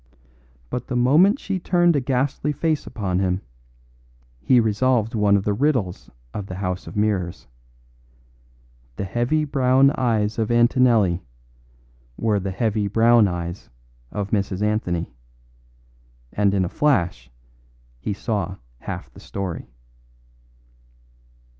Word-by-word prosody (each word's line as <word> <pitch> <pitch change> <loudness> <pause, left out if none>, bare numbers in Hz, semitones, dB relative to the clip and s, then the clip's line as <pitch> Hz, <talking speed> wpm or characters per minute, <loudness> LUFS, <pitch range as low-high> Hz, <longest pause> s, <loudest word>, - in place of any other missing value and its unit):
But 125 - -4
the 125 - -3
moment 150 - +4
she 195 -7 -3
turned 175 -1 +3
a - - +3
ghastly 135 +3 0
face 155 +1 -1
upon 95 -4 -2
him, 95 0 0 1.0
he 125 - +4
resolved 115 +1 +1
one 105 -2 +3
of 95 - -2
the 105 - 0
riddles 120 -7 -1 0.2
of 100 -2 -5
the 95 - -6
house 90 -1 -3
of - - -9
mirrors. 100 -5 -1 1.5
The - - -4
heavy 120 - 0
brown 135 -1 +4
eyes 115 -5 0
of 110 - 0
Antonelli 120 -6 +3 1.0
were 110 -2 +1
the 95 0 -3
heavy 105 +1 0
brown 115 +1 +5
eyes 85 0 -5 0.4
of 100 -1 -4
Mrs. 100 -1 -1
Anthony; 90 - -1 1.2
and 100 -1 +2
in 95 -2 +2
a - - -2
flash 85 - 0 0.7
he 105 - -3
saw 100 -3 -3 0.2
half - - -7
the - - -14
story. 95 -9 -5
105 Hz, 120 wpm, -22 LUFS, 95-130 Hz, 1.5 s, brown